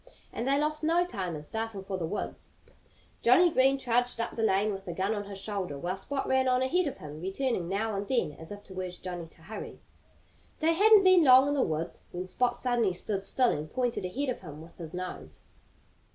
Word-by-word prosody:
And 235 - -3
they 275 +1 +3
lost 305 +1 0
no 335 +3 +3
time 185 - -4
in 150 - -7
starting 220 +3 -4
for 195 0 -4
the 170 -3 -2
woods. 205 - -5 0.7
Johnnie 355 -1 +6
Green 270 -1 +4
trudged 245 -2 0
up 230 - -2
the 230 - -3
lane 210 -1 +2
with 195 0 -7
the 175 - -5
gun 195 +4 0
on 205 -1 -4
his 200 -1 -8
shoulder, 195 -7 -4
while 175 +6 -3
Spot 270 +8 -3
ran 265 0 +2
on 255 0 +3
ahead 340 +6 +1
of 280 - -5
him, 150 +1 -9
returning 190 -1 -2
now 215 +3 -1
and 200 0 -3
then 240 - +1
as 160 +4 -10
if 205 0 -8
to 190 -2 -8
urge 180 -1 -7
Johnnie 175 -2 -5
to 160 0 -16
hurry. 215 +6 -8 0.8
They 325 +1 +3
hadn't 415 +3 +6
been 370 -2 +6
long 260 0 +7
in - - +1
the 285 - +2
woods 160 -4 -2
when 180 +1 -4
Spot 245 +6 +1
suddenly 240 -6 +1
stood 195 +2 -3
still 250 +4 +2
and 150 +1 -4
pointed 245 -4 -1
ahead 260 +10 -2
of 250 - -2
him 155 -5 -9
with 165 +3 -14
his 165 0 -6
nose. 80 - -6
210 Hz, 225 wpm, -29 LUFS, 180-260 Hz, 0.8 s, long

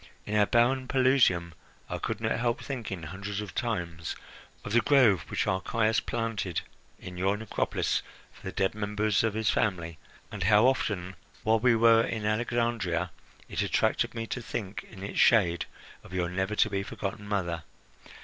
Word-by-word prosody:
In 105 - -3
our 105 -1 +4
barren 130 +2 +3
Pelusium 125 -11 +3 0.3
I - - -4
could - - -3
not - - -1
help 120 +1 0
thinking 110 - -5
hundreds 100 +5 -5
of 105 -3 -6
times 85 -9 -3 0.5
of - - -5
the 120 - +5
grove 120 - +4
which - - -1
Archias 110 +4 +1
planted 115 -7 -2 0.4
in 90 -1 -9
your 95 +2 +1
necropolis 110 -1 -1 0.3
for - - -19
the 95 - -5
dead 95 0 0
members 105 0 0
of 110 -2 0
his 110 -2 +2
family, 85 -6 -1 0.3
and 105 - -6
how 105 +5 +5
often, 100 -8 0 0.3
while 110 +1 +3
we 120 +1 +4
were 115 0 +6
in 110 -2 -2
Alexandria, 110 -6 0 0.4
it - - -2
attracted - - +1
me 115 0 -3
to 125 - -4
think 105 -4 -5
in 95 -3 -10
its 100 - -4
shade 90 -7 +4 0.4
of 90 - -13
your 90 -2 0
never 95 +4 -1
to 110 - +3
be 100 -1 0
forgotten 100 +1 -5
mother. 90 -5 -1
105 Hz, 170 wpm, -28 LUFS, 95-115 Hz, 0.5 s, were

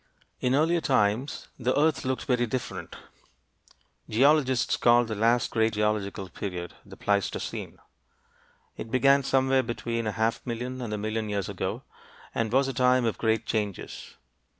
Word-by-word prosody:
In 125 +1 +1
earlier 165 +3 +2
times 125 0 0
the 130 +2 0
earth 155 +1 +2
looked 130 0 -2
very 125 -2 +1
different. 125 +1 -5 1.1
Geologists 130 +1 +3
call 120 0 +4
the 110 - -4
last 115 +3 +2
great 110 -1 +2
geological 105 -2 -1
period 90 -2 -6
the - - -13
Pleistocene. 100 -2 -2 1.0
It 115 - -6
began 135 +3 +4
somewhere 135 0 +2
between 115 -1 -3
a - - 0
half 110 +2 0
million 125 +2 -4
and 120 -3 -4
a 105 - -2
million 110 +1 -2
years 100 -2 -2
ago, - - -4 0.5
and 115 -2 -1
was 135 +2 +3
a 135 - -3
time 125 0 +3
of 115 - -1
great 110 0 +1
changes. 105 -4 -4
120 Hz, 150 wpm, -27 LUFS, 110-130 Hz, 1.1 s, call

